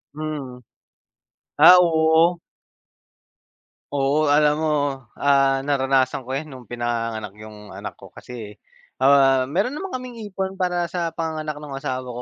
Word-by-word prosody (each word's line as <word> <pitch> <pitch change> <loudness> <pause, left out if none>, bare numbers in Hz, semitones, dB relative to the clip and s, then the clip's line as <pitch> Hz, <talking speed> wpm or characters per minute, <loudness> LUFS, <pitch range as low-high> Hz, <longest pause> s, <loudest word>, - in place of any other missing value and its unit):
Mm. 145 -5 -6 1.0
Ah, 180 - +9
oo. 165 0 +3 1.5
Oo 145 +2 +1
alam 150 0 +4
mo, 155 -1 +1 0.5
ah, 135 -1 +3
naranasan 135 -2 0
ko 130 - -8
'yan 140 +4 -3
nung 130 -4 -11
pinanganganak 115 -3 -3
'yong 105 -2 -12
anak 100 +1 -8
ko 95 - -12
kasi, 110 -4 -10 0.5
ah, 135 -1 +5
mayro'n 195 - -1
naman 385 +4 -6
kaming 250 -3 -7
ipon 190 -1 -4
para 180 -2 -1
sa 170 -1 -3
panganganak 155 -2 -4
ng 145 -2 -9
asawa 130 -2 -4
ko 125 0 -6
140 Hz, 135 wpm, -22 LUFS, 130-165 Hz, 1.5 s, Ah